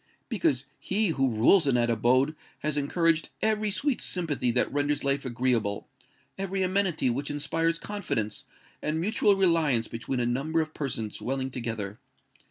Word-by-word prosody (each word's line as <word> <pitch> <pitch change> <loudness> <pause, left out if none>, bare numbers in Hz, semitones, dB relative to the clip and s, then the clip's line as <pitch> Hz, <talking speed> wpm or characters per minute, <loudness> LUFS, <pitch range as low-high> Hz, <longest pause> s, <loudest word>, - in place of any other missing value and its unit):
Because 145 - +1
he 205 +1 0
who 135 -4 +1
rules 125 - +4
in 135 - +3
that 120 -1 +2
abode 130 +6 +3 0.3
has 150 -1 -1
encouraged 165 +3 +1
every 215 -1 +1
sweet 260 +6 0
sympathy 155 -8 0
that 125 +2 +1
renders 145 0 0
life 140 0 0
agreeable—every 130 - -2
amenity 185 -8 +1
which 140 +4 -3
inspires 165 +3 0
confidence 165 - -3 0.4
and 155 +1 -1
mutual 205 +2 +3
reliance 165 -11 +2
between 120 +3 -3
a 120 - +1
number 140 +7 0
of 155 -1 -2
persons 115 -7 -3
dwelling 135 +1 -2
together. 115 -5 -4
145 Hz, 145 wpm, -28 LUFS, 125-170 Hz, 0.4 s, rules